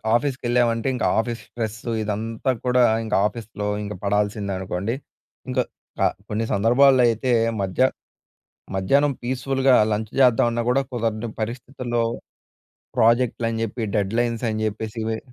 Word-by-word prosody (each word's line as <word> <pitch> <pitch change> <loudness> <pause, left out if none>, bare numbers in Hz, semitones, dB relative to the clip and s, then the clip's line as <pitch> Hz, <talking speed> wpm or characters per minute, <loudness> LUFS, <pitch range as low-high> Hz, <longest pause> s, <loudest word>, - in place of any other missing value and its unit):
ఆఫీస్‌కెళ్ళామంటే 120 -2 +1
ఇంకా 125 - -1
office 115 0 -2
stress 110 -2 -4 0.3
ఇదంతా 110 +5 -2
కూడా 125 0 +4 0.2
ఇంక 110 - -5
ఆఫీస్‌లో 105 -2 -6 0.2
ఇంక 105 0 -5
పడాల్సిందే 105 0 0
అనుకోండి. 95 +5 -2 0.5
ఇంకా 125 0 +1 0.4
కా - - +4 0.2
కొన్ని 110 +1 -1
సందర్భాల్లో 125 +5 +5
అయితే 115 +3 0 0.3
మధ్య 95 +5 -2 1.0
మధ్యాహ్నం 140 +10 +3
పీస్ఫుల్‍గా 130 +1 +2 0.2
లంచ్ 105 0 -2
చేద్దామన్నా 120 -2 +4
కూడా 135 +2 +3
కుదరని 115 -1 -2
పరిస్థితుల్లో 120 +1 -3 1.0
ప్రాజెక్ట్‌లు 115 0 +3
అని 115 0 -3
చెప్పి 110 -1 -4
డెడ్లైన్స్ 115 +4 0
అని 110 0 -2
చెప్పేసి 110 +1 -4
ఇవి 110 0 -1
115 Hz, 120 wpm, -23 LUFS, 110-125 Hz, 1.0 s, సందర్భాల్లో